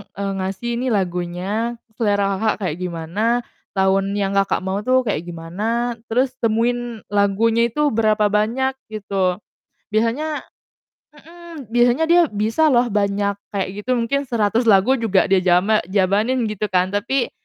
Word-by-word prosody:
eee, 200 0 -3
ngasih 195 +5 -3
ini 260 - -2
lagunya 190 +3 -2 0.2
selera 200 -3 +1
Kakak 220 -1 +1
kayak 155 - -2
gimana, 175 +3 -3 0.5
tahun 195 +1 +1
yang 195 -1 0
Kakak 195 0 +1
mau 190 +1 -2
tuh 255 0 +3
kayak 210 -8 -1
gimana 210 +9 -3
terus 250 +3 +1
temuin 235 0 -1
lagunya 220 +3 +2
itu 295 +5 0
berapa 215 -2 +2
banyak 230 +6 +1 0.2
gitu, 195 -4 -1 0.6
biasanya 280 +8 0 0.7
mhm, 330 -5 -12
biasanya 240 +5 +3
dia 340 +2 +5
bisa 220 +8 +1
loh 245 -4 +3
banyak 200 0 0 0.2
kayak 195 -2 0 0.2
gitu 255 0 0
mungkin 270 +4 -1
100 230 0 +1
lagu 220 +6 +4
juga 205 -4 +2
dia 195 - +5
jama 185 +4 +3
jabanin 205 +6 +1
gitu 210 0 -2
kan 185 -1 +1
tapi, 235 +5 -1
215 Hz, 140 wpm, -20 LUFS, 195-240 Hz, 0.7 s, dia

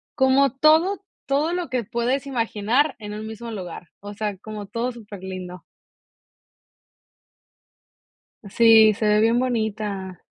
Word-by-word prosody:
como 265 -1 +3
todo 320 +7 +4 0.3
todo 285 +4 +1
lo 355 -4 -3
que 250 -2 -1
puedes 240 +5 -1
imaginar 245 +3 0
en 210 -1 -7
un 215 +1 -6
mismo 230 +1 -7
lugar, 180 -4 -8
o 205 +1 -9
sea, 205 -1 -4
como 210 +1 -8
todo 235 +4 -3
súper 210 -4 -11
lindo. 185 -2 -7 2.9
Sí, 220 0 +6
se 215 +1 -3
ve 210 0 +4
bien 230 +2 +3
bonita. 215 -6 -3
225 Hz, 130 wpm, -23 LUFS, 205-255 Hz, 2.9 s, Sí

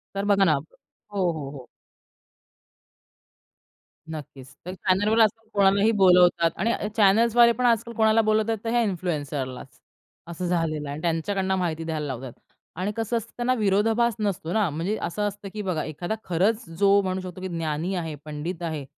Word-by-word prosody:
तर 195 +1 -2
बघा 200 -1 +4
ना 165 -5 +4
हो, 140 - -1 0.7
हो, 150 -4 -6
हो. 135 -4 -10 2.4
नक्कीच. 140 -3 -9
तर 180 - -5
चॅनलवर 205 +4 +1
आजकाल 220 +1 +1
कोणालाही 200 +2 +4
बोलावतात 180 -2 +5
आणि 225 +5 +1
अ 210 - -2
चॅनल्सद्वारे 230 +3 +5
पण 250 +2 -1
आजकाल 235 0 +2
कोणाला 220 0 +4
बोलवतात, 220 +1 +1
तर 225 - -2
ह्या 240 +1 +2
इन्फ्लुएन्सरलाच. 150 - -4 0.5
असं 175 +1 -4
झालेलं 160 -4 -1
आहे 140 - -4
आणि 155 - -8
त्यांच्याकडनं 190 +3 0
माहिती 165 -3 -2
द्यायला 155 -2 -3
लावतात 130 -2 -6 0.5
आणि 195 +3 -1
कसं 225 +1 -1
असतं 230 0 -6
त्यांना 245 +1 +1
विरोधाभास 220 +1 +2
नसतो 185 -5 -2
ना. 210 -6 +2
म्हणजे 165 +8 -2
असं 210 - -3
असतं, 205 0 -7
की 215 - -4
बघा 180 -6 -2
एखादा 175 +7 -4
खरंच 195 +6 0
जो 200 0 +5
म्हणू 185 -1 -2
शकतो 185 0 -8
की 190 - -3
ज्ञानी 165 0 -2
आहे, 165 -4 -3
पंडित 155 +4 -5
आहे, 155 -4 -4
185 Hz, 165 wpm, -25 LUFS, 160-215 Hz, 2.4 s, बोलावतात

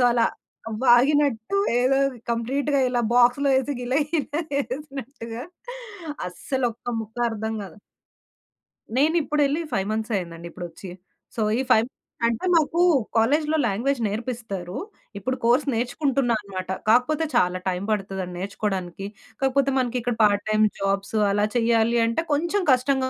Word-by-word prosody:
So, - - +4
అలా 235 -1 +3 0.6
వాగినట్టు 260 - +4 0.2
ఏదో 265 +2 +3 0.3
కంప్లీట్‌గా 270 +5 0
ఇలా 245 -1 0
బాక్స్‌లో 245 +3 +4
ఏసి 270 +2 -2
గిల 245 +1 -2 0.2
గిల 305 -3 -1 0.3
ఏసినట్టుగా 265 -4 -6 0.9
అస్సలు 260 +8 -2
ఒక్క 235 - -7
ముక్క 225 +1 -9
అర్థం 220 0 -3
గాదు. 195 0 -10 1.2
నేనిప్పుడెళ్లి 300 0 +2
5 195 0 0
మంత్స్ 220 +1 -3
అయిందండి 170 -1 -6
ఇప్పుడొచ్చి. 175 +2 -8 0.5
సో, - - 0 0.2
ఈ - - +2
5 220 +2 +5 0.4
అంటే 235 +7 -2
మాకు 325 +1 +2 0.4
కాలేజీలో 300 +7 +2
లాంగ్వేజ్ 240 +6 0
నేర్పిస్తారు. 210 -5 -4 0.4
ఇప్పుడు 255 +6 -2
కోర్స్ 245 +5 +3
నేర్చుకుంటున్నా 245 +1 0
అన్నమాట. 190 -3 -7 0.2
కాకపోతే 285 +8 +3
చాలా 180 -6 +3
టైం 185 0 -1
పడతదండి 195 -3 -3
నేర్చుకోవడానికి. 195 -1 -3 0.4
కాపోతే 270 0 +2
మనకిక్కడ 245 -1 0
పార్ట్ 205 -1 +3
టైమ్ 215 0 +4
జాబ్స్ 195 +1 -1 0.2
అలా 205 +1 +2
చేయాలి 230 0 +3
అంటే 230 +8 0
కొంచెం 345 +7 +1
కష్టంగా 260 +1 +2
240 Hz, 125 wpm, -24 LUFS, 205-275 Hz, 1.2 s, 5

